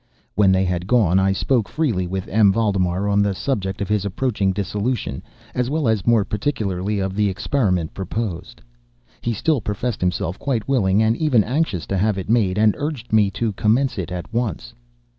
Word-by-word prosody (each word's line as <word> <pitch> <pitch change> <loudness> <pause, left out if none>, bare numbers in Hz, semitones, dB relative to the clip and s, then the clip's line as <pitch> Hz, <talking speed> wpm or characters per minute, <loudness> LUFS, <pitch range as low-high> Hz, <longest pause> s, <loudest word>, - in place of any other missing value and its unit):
When 100 -1 +4
they 95 0 +2
had 90 0 -2
gone, 100 -6 +3
I 95 0 +3
spoke 115 +3 0
freely 115 - 0
with 95 +1 -4
M. 105 -1 +4
Valdemar 95 -3 0
on 100 0 +3
the 100 -1 +1
subject 95 -3 -2
of 100 - -1
his 105 -2 0
approaching 100 -1 0
dissolution, 105 +5 -2 0.3
as 125 0 -1
well 150 -2 0
as, 110 -3 0
more 115 -4 +4
particularly, 105 -4 -2
of 95 -1 -2
the 105 -1 +2
experiment 95 - 0
proposed. 95 -1 -5 0.6
He 120 - -1
still 145 +4 0
professed 105 +3 -3
himself 90 0 -1
quite 120 -7 -2
willing 110 -6 +2
and 110 +1 +2
even 135 -9 +3
anxious 125 - -1
to 100 - -2
have 105 0 +1
it 95 +3 -3
made, 105 -5 +2
and 105 -1 +4
urged 145 -7 -4
me 105 -2 +4
to 105 +2 -2
commence 115 +4 +1
it 90 0 -4
at 90 +4 -6
once. 110 - -2
105 Hz, 185 wpm, -21 LUFS, 95-120 Hz, 0.6 s, When